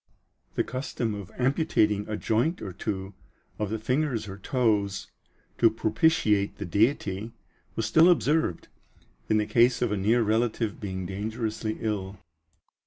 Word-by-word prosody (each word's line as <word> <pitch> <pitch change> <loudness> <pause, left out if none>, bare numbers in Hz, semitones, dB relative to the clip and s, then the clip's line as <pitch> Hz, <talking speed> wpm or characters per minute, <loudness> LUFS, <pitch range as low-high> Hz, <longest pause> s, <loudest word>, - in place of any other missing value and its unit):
The - - +2
custom 125 -3 -3
of 100 -3 -7
amputating 125 - +1
a 105 - -2
joint 120 +10 0
or 95 -4 -6
two 95 0 -4 0.5
of 105 -2 -1
the 110 - -1
fingers 125 0 -1
or 100 0 -8
toes, 105 -5 0 0.5
to 115 - +6
propitiate 110 - +1
the 100 - -5
Deity, 105 - 0 0.4
was 115 - -1
still 160 +11 +6
observed, 155 - +1 0.6
in 110 - +4
the 105 - +1
case 120 +3 +3
of 120 -3 0
a 105 - 0
near 110 +5 +3
relative 110 0 0
being 95 -2 -4
dangerously 110 +3 -3
ill. 100 -3 -3
110 Hz, 140 wpm, -27 LUFS, 100-120 Hz, 0.6 s, to